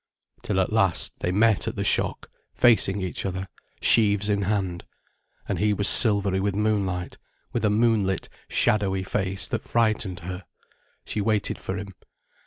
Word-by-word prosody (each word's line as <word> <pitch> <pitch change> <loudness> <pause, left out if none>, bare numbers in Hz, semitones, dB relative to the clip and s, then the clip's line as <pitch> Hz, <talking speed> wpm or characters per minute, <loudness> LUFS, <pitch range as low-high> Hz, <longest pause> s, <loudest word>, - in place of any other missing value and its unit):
Till 95 -3 -1
at 95 +3 0
last, 95 -6 +2
they 90 - -1
met 105 +2 +3
at - - -3
the - - -2
shock, - - 0 0.2
facing 105 -4 +3
each 90 - -4
other, 95 0 -4 0.4
sheaves 105 -2 +4
in 100 -1 +1
hand. 95 -3 -2 0.6
And - - -2
he 105 0 +2
was 100 0 0
silvery 100 -4 +2
with 100 0 -1
moonlight, 100 -4 -1 0.3
with 115 - -1
a 105 - +3
moonlit, 105 -3 +1 0.2
shadowy 100 -4 +1
face 95 0 -2
that - - -2
frightened 110 -6 0
her. 90 +2 -6 0.6
She 105 - -3
waited 105 0 0
for 95 - -4
him. 95 0 -7
100 Hz, 155 wpm, -25 LUFS, 95-105 Hz, 0.6 s, sheaves